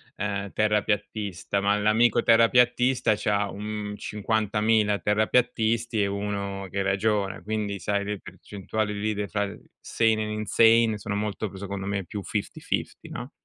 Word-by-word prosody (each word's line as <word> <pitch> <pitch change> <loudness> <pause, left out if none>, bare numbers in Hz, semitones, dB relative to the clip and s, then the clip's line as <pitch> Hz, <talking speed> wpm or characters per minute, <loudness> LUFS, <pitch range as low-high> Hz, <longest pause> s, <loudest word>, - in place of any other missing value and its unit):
ehm, 100 -1 -3
terrapiattista, 105 -2 -1
ma 100 +1 +2
l'amico 110 +3 +3
terrapiattista 125 +1 +4
c'ha 105 -1 0
un 105 +1 -5
50.000 105 0 +1
terrapiattisti 115 +1 +1
e - - +1
1 100 -1 -3
che 100 - -1
ragiona, 100 0 0
quindi 105 -2 -3
sai 100 -1 -1
le 105 -1 -3
percentuali 105 +2 -4
lì 110 +1 -1
le 105 0 -2
far 100 -1 -3 0.2
sane 110 -1 +1
and 105 - -4
insane 110 +1 +4
sono 100 0 -4
molto 105 0 -2
pre 95 - -11
secondo 100 0 -5
me 100 -2 -2
più 105 - -6
fifty 105 -2 -4
fifty - - -3
no? - - -7
105 Hz, 145 wpm, -26 LUFS, 100-110 Hz, 0.2 s, terrapiattista